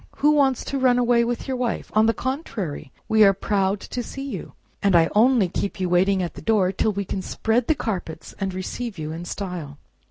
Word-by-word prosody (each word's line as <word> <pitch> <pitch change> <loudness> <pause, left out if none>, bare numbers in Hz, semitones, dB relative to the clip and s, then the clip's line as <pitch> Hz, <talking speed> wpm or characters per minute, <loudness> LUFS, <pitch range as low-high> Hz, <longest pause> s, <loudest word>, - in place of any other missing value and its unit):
Who 295 - +3
wants 275 -4 +2
to 275 - -2
run 255 -1 +4
away 240 -1 +3
with 240 +2 -3
your 265 - -1
wife? 245 -2 -2
On 215 +1 +4
the 225 - +3
contrary, 215 - -4 0.2
we 220 0 +5
are 195 -1 +6
proud 195 0 0
to 245 - -4
see 270 +3 -7
you, - - -6 0.3
and 200 -2 +3
I 165 -1 +4
only 230 -2 +4
keep 195 +3 -3
you 185 -1 -1
waiting 185 +2 +3
at 170 - -4
the - - -10
door 205 -5 +2
till 205 +3 0
we 200 0 -3
can 190 - -3
spread 225 +5 0
the 315 - +3
carpets, 175 - -5
and 195 -1 -1
receive 195 +4 -5
you 155 -1 -4
in 165 +2 -6
style." 175 -7 -5
205 Hz, 220 wpm, -23 LUFS, 185-245 Hz, 0.3 s, are